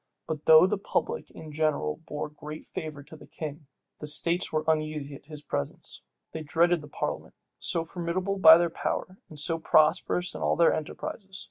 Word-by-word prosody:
But 155 -2 -5
though 160 +2 +8
the 195 +1 -1
public 465 - -2
in 155 -1 -11
general 150 - 0
bore 150 -1 -5
great 150 +1 -9
favor 150 -3 -7
to 160 - -13
the 150 - -14
king, 150 -1 -7 0.3
the 150 - -5
states 170 +4 +2
were 155 0 0
uneasy 155 -2 -1
at 140 - -13
his 150 -2 -9
presence. 70 - -5 0.3
They 160 - -5
dreaded 170 +2 +2
the 150 - -11
parliament, - - -5 0.2
so 165 -1 0
formidable 180 +3 -3
by 160 -2 +10
their 170 -1 0
power, 185 +3 -3
and 155 - -11
so 165 +3 0
prosperous 170 +3 +2
in - - -7
all - - +2
their 170 -1 +4
enterprises. 190 +5 -6
160 Hz, 185 wpm, -27 LUFS, 150-170 Hz, 0.3 s, by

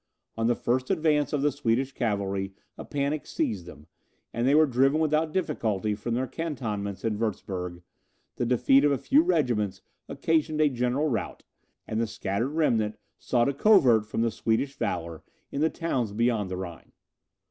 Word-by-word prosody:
On 115 0 0
the 120 - +3
first 125 +3 -1
advance 155 -6 +2
of 145 -2 0
the 145 - +3
Swedish 130 0 0
cavalry 100 -5 -2 0.2
a - - -8
panic 145 +1 -2
seized 95 -6 -2
them, 75 -4 -12 0.5
and 120 +2 0
they 140 - +4
were 155 +1 +6
driven 135 +3 +2
without 155 0 +1
difficulty 110 - -1
from 110 +3 -3
their 130 +2 0
cantonments 110 - -4
in 105 -2 -1
Wurtzburg; 90 -5 -3 0.5
the 120 - 0
defeat 125 +3 +4
of 145 - +4
a 140 - +2
few 280 - +4
regiments 125 - 0 0.3
occasioned 155 -1 0
a 155 -1 +5
general 125 +3 0
rout, 125 -6 -3 0.4
and 110 +1 -1
the 115 - 0
scattered 105 +3 -2
remnant 110 -9 +1 0.2
sought 120 -1 +1
a 140 - +1
covert 135 - +5
from 115 - -1
the 115 - +1
Swedish 115 +6 0
valour 85 - -3 0.3
in 140 - -2
the 160 - +3
towns 130 -12 -2
beyond 115 -3 +1
the 90 - -4
Rhine. 90 -3 -8
120 Hz, 170 wpm, -27 LUFS, 105-145 Hz, 0.5 s, were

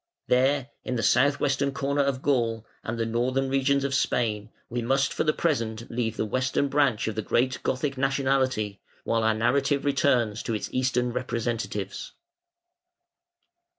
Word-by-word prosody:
There, 135 +1 +2
in 125 - -3
the 115 - -1
south 140 +5 +3
western 140 0 +1
corner 140 +1 0
of 140 -1 -1
Gaul 115 -5 +1 0.2
and 115 +1 -4
the 115 - 0
northern 125 +4 0
regions 135 +1 +2
of 140 -1 -1
Spain, 110 -5 0 0.2
we 120 +1 -3
must 135 +4 +1
for - - 0
the 155 - +3
present 115 -9 -2
leave 115 -2 -2
the - - 0
Western 130 +5 0
branch 140 -7 +2
of 110 - -1
the 110 - -2
great 130 +4 0
Gothic 135 +1 -2
nationality, 130 -6 0 0.2
while 115 0 +1
our 110 0 +2
narrative 135 +5 +1
returns 125 -6 +2
to 115 - -2
its 105 - -4
Eastern 125 -1 0
representatives. 115 -5 -3
130 Hz, 155 wpm, -26 LUFS, 115-135 Hz, 0.2 s, south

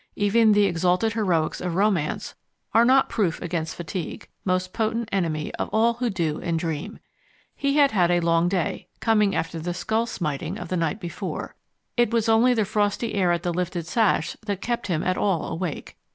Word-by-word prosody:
Even 215 +2 +4
the 205 0 +4
exalted 180 +4 +1
heroics 180 -8 0
of 180 -2 -2
romance 190 -6 0 0.4
are 230 - +6
not 265 +2 +5
proof 190 -7 0
against 165 -2 -3
fatigue, 175 0 -5 0.2
most 185 -1 -1
potent 225 0 -1
enemy 165 -6 -1
of - - -2
all 230 +2 +3
who 240 +1 -2
do 165 -6 -2
and 165 -2 -1
dream. 165 +5 -4 0.6
He 280 0 0
had 285 -2 +5
had 180 -5 +3
a 175 0 +3
long 170 0 +2
day, 180 -4 -2
coming 210 -3 +2
after 165 0 -2
the 175 +2 -3
skull 220 +6 0
smiting 150 -11 -3
of - - -7
the 185 - -1
night 165 +5 -1
before; 175 -3 -5 0.4
it 240 -1 +4
was 230 -1 +1
only 230 +3 +4
the 220 -2 +2
frosty 210 +2 0
air 185 -3 +2
at 170 -1 0
the 175 - -1
lifted 180 -1 -2
sash 210 +4 +1
that 200 -2 -1
kept 240 +2 -2
him 170 -4 0
at 185 0 0
all 185 -6 0
awake. 170 -2 -5
185 Hz, 190 wpm, -24 LUFS, 170-220 Hz, 0.6 s, are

